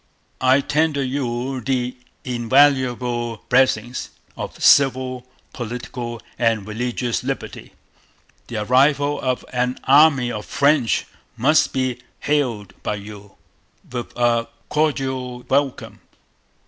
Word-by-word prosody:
I 130 +2 +4
tender 150 -1 +1
you 130 -1 -2
the 125 -1 -1 0.3
invaluable 125 -2 +1
blessings 125 -2 +2 0.3
of - - -7
Civil, 130 -2 +3 0.3
Political, 120 0 -5 0.2
and 115 -4 +1
Religious 120 +2 -2
Liberty... - - -5 0.7
The 110 -3 -3
arrival 140 +4 +3
of 130 -1 -1
an 125 0 0
army 140 -3 +5
of 105 -2 -6
Friends 140 -4 +2 0.3
must 150 +7 +3
be 130 -2 -1 0.2
hailed 120 -10 -1
by - - -2
you 100 0 -11 0.6
with 120 -1 -5
a 120 -1 +2 0.2
cordial 130 -5 -1
welcome. 140 -1 -1
125 Hz, 100 wpm, -21 LUFS, 120-135 Hz, 0.7 s, army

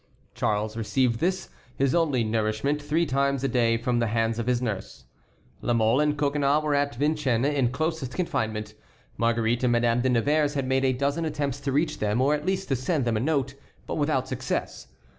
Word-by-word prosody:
Charles 105 +1 -1
received 115 +1 0
this, 185 +2 -1 0.3
his 135 -1 +1
only 150 -8 +2
nourishment, 110 +6 0
three 155 +3 +1
times 140 -1 0
a - - +2
day 115 -2 +2
from 120 +1 0
the 115 - +1
hands 115 +1 0
of 115 - -3
his 125 -1 +2
nurse. 110 -6 -5 0.6
La 120 - 0
Mole 115 +3 +3
and 150 0 +1
Coconnas 145 +1 +1
were 150 -1 0
at 145 -2 0
Vincennes 140 -3 +1
in 140 -4 +1
closest 155 -1 -2
confinement. 110 -12 -2 0.4
Marguerite 115 +1 +1
and 120 - +3
Madame 120 0 +2
de 130 - +1
Nevers 145 +5 +2
had 135 -2 -1
made 130 +1 +1
a 130 - +3
dozen 140 +5 -1
attempts 145 -3 -2
to 140 -1 -3
reach 150 +3 0
them, 105 +2 0
or 140 +3 +3
at 150 +3 -3
least 190 0 -1
to 135 - +2
send 135 +2 -1
them 115 -2 0
a - - +1
note, 135 0 0 0.3
but - - -4
without 145 -4 0
success. 130 0 -4
130 Hz, 200 wpm, -26 LUFS, 115-145 Hz, 0.6 s, Mole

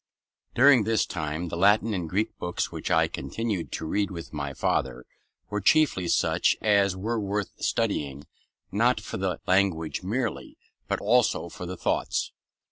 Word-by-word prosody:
During 130 -2 +6
this 110 +1 +1
time, 80 +1 -4
the - - -4
Latin 105 +5 +3
and 90 -4 -3
Greek 105 +6 -1
books 90 0 -2
which - - -5
I - - +4
continued 110 -7 -4
to - - -4
read 100 +5 0
with 85 -4 -8
my 70 -2 -3
father 65 - -1 0.5
were 105 0 -1
chiefly 95 - +3
such - - +2
as 100 -3 +3
were 115 +4 -2
worth 100 -1 -2
studying, 70 -1 -1 0.5
not 115 +4 +2
for 105 - -6
the 95 -2 -2
language 90 -4 +1
merely, 115 +5 -3 0.3
but - - -1
also - - +2
for 90 - -8
the 90 +1 -6
thoughts. - - -1
95 Hz, 155 wpm, -26 LUFS, 85-110 Hz, 0.5 s, During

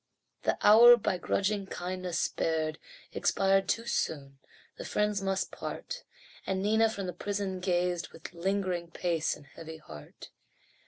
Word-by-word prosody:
The - - 0
hour 240 +3 +9
by 195 -4 -1
grudging 200 +2 0
kindness 180 -1 -3
spared 155 -1 -1 0.3
Expired 195 0 +2
too 230 - 0
soon 140 -10 -2 0.4
the - - -6
friends 210 -1 0
must 195 0 -1
part - - -6 0.4
And 190 0 -1
Nina 220 +2 +3
from 200 -3 -4
the 180 - -4
prison 195 0 -3
gazed, 180 -1 0
With 160 - -10
lingering 180 -1 -1
pace 170 -2 -1
and 145 - -15
heavy 160 +3 -10
heart. 75 - -12
185 Hz, 140 wpm, -30 LUFS, 170-200 Hz, 0.4 s, hour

